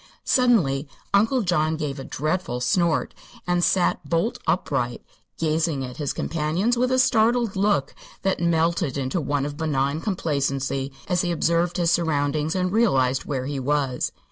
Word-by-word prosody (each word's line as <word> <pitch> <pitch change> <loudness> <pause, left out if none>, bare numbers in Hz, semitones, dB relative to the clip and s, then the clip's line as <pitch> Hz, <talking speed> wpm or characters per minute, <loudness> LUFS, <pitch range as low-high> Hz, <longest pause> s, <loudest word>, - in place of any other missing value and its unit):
Suddenly 175 - +3 0.3
Uncle 225 +5 +3
John 160 -3 +1
gave 145 -3 -4
a - - -5
dreadful 155 -3 -2
snort 170 +5 +1 0.3
and 175 0 +1
sat 180 0 +2
bolt 170 +8 0
upright, - - -1 0.3
gazing 155 -3 0
at 125 -1 -9
his 145 -3 -2
companions 165 +9 0
with 250 +1 +1
a 260 - +3
startled 235 -3 +3
look 190 -8 +1 0.3
that 195 -1 +1
melted 165 -3 +1
into 135 +6 -1
one 140 -1 -1
of 145 0 -5
benign 145 -1 0
complacency 140 -7 -1 0.2
as 180 -2 +1
he 175 - -1
observed 170 +1 +1
his 170 -1 +2
surroundings 155 -1 0
and 185 -1 0
realized 135 - +2
where 130 -3 -3
he 140 0 -3
was. 135 -1 0
160 Hz, 150 wpm, -24 LUFS, 140-185 Hz, 0.3 s, Suddenly